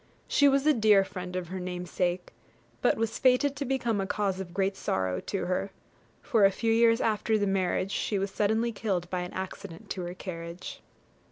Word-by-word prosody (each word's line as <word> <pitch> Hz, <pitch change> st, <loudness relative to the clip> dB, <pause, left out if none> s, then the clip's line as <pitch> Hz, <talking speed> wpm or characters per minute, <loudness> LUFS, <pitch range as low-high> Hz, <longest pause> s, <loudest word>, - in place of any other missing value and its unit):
She 285 Hz, -, +4 dB
was 275 Hz, 0 st, +3 dB
a 305 Hz, -, +6 dB
dear 215 Hz, -5 st, +5 dB
friend 180 Hz, -1 st, -7 dB
of 180 Hz, -2 st, -3 dB
her 190 Hz, +1 st, -4 dB
namesake, 180 Hz, -1 st, -3 dB, 0.5 s
but -, -, +3 dB
was 225 Hz, 0 st, -2 dB
fated 265 Hz, +2 st, +3 dB
to 280 Hz, -, -3 dB
become 240 Hz, -5 st, 0 dB
a 190 Hz, -, -3 dB
cause 195 Hz, -2 st, -1 dB
of 185 Hz, -2 st, -6 dB
great 195 Hz, +2 st, 0 dB
sorrow 95 Hz, -, -1 dB
to 195 Hz, -, -3 dB
her, 185 Hz, +2 st, -1 dB, 0.5 s
for 220 Hz, -3 st, +2 dB
a 195 Hz, -, +8 dB
few 225 Hz, +3 st, 0 dB
years 230 Hz, 0 st, +4 dB
after 220 Hz, -1 st, +1 dB
the 205 Hz, -, +1 dB
marriage 195 Hz, 0 st, 0 dB
she 205 Hz, -, -1 dB
was 195 Hz, 0 st, -2 dB
suddenly 220 Hz, +3 st, +1 dB
killed 195 Hz, -5 st, -2 dB
by 180 Hz, -, -1 dB
an 180 Hz, 0 st, -5 dB
accident 190 Hz, -2 st, -7 dB
to 185 Hz, -, -3 dB
her 175 Hz, +1 st, -6 dB
carriage. 170 Hz, -1 st, -7 dB
195 Hz, 195 wpm, -28 LUFS, 180-225 Hz, 0.5 s, a